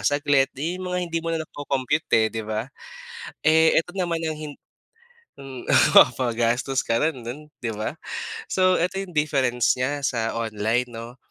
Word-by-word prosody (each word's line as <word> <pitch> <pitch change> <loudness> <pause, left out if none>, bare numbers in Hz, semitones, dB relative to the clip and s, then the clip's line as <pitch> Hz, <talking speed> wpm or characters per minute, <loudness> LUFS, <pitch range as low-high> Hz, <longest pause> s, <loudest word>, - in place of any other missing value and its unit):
saglit, 145 -1 +2
'yun 170 +6 -3
'yung 185 - -5
mga 180 0 -1
hindi 165 -1 -2
mo 165 - -5
na 165 -1 -1
nako-compute 145 0 -2
eh 110 -1 +4
'di 115 - -3
ba. 110 +1 -2 0.8
Eh, 160 +1 +5
eto 180 +3 -11
naman 170 -3 -1
ang 160 -1 -2
hin 150 -1 -7 0.9
hmm 135 -2 -9 0.2
oh - - +9
mapagastos 120 +2 0
ka 115 - +1
rin 155 -5 0
dun 150 +6 -7
'di 120 - -2
ba. 110 +1 -3 0.6
So, 185 -1 +3
eto 180 +2 -1
'yung 190 -2 -8
difference 130 -6 +2
niya 140 +3 -1
sa 115 -3 -1
online 110 +2 0
'no, 120 +2 -9
140 Hz, 170 wpm, -24 LUFS, 120-160 Hz, 0.9 s, oh